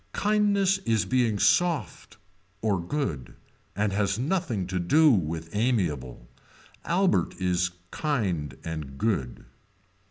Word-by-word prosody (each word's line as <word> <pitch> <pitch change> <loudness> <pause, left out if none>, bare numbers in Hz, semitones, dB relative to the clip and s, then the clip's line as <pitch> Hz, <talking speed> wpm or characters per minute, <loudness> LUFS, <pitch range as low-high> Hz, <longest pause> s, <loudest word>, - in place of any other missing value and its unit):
Kindness 200 -2 +2
is 110 - 0
being 115 0 +1
soft 155 - +1 0.5
or 100 -5 +1
good 85 - -3 0.4
and 100 0 0
has 100 0 0
nothing 125 - -1
to 90 0 -2
do 150 - +5
with 80 -4 -2
amiable. 80 - -1 0.6
Albert 175 - +1
is 90 -1 +1 0.2
kind 95 - -2
and 75 -4 -6
good. 95 - -2
100 Hz, 105 wpm, -26 LUFS, -, 0.6 s, do